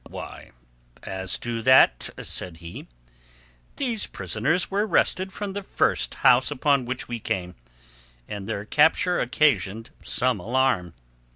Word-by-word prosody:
"Why, - - -9 0.5
as 95 -1 -3
to 115 -1 -4
that," 115 - +5
said 85 -2 -4
he, 85 0 -10 0.9
"these 240 -6 -2
prisoners 115 - -1
were 205 +2 +1
wrested 190 -2 +1
from 200 +1 -5
the 200 - -4
first - - 0
house 125 +1 +4
upon 140 -2 +1
which 130 +1 -4
we 120 -1 -4
came, 90 -4 -3 0.7
and 100 -1 -6
their 100 - -3
capture 160 +7 +3
occasioned 115 - +1
some 125 -4 0
alarm. 115 -5 0
125 Hz, 125 wpm, -25 LUFS, 95-155 Hz, 0.9 s, that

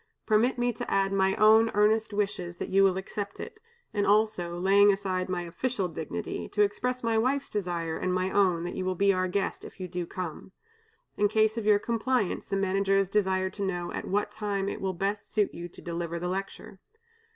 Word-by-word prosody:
Permit 225 +4 +3
me 245 0 +1
to 230 - -6
add 195 0 +2
my 190 0 +2
own 220 +1 +6
earnest 215 +2 +3
wishes 195 -4 -2
that - - -5
you 195 +1 +4
will 190 -1 +3
accept 200 +1 -5
it; 440 - -8 0.3
and 205 -1 0
also, 205 -5 +2
laying 200 +3 +5
aside 190 -2 -2
my 180 -1 -2
official 190 +4 -2
dignity, 90 - -5
to 210 - +2
express 250 +5 -1
my 225 -1 +2
wife's 270 +4 0
desire 175 -5 -2
and 185 - -1
my 185 +1 0
own 185 -4 +2
that 175 - -4
you 185 - -3
will 185 0 -1
be 200 +2 +3
our 185 0 0
guest, 195 +2 -2
if - - -11
you 185 - -4
do 175 -1 -4
come. 185 0 -6 0.6
In 205 - +4
case 220 +1 +2
of 225 -2 -3
your 210 -1 +6
compliance, 235 0 -1
the 195 - -1
Managers 195 0 +1
desire 190 -2 +1
to 200 - -8
know 175 -3 -2
at - - -4
what 205 +2 0
time 200 -2 -2
it - - -4
will 190 -1 -1
best 200 +3 -3
suit 210 -2 +1
you 175 +1 -7
to - - -14
deliver 170 0 -3
the 175 +1 -3
lecture. 195 0 -5
195 Hz, 205 wpm, -28 LUFS, 185-210 Hz, 0.6 s, own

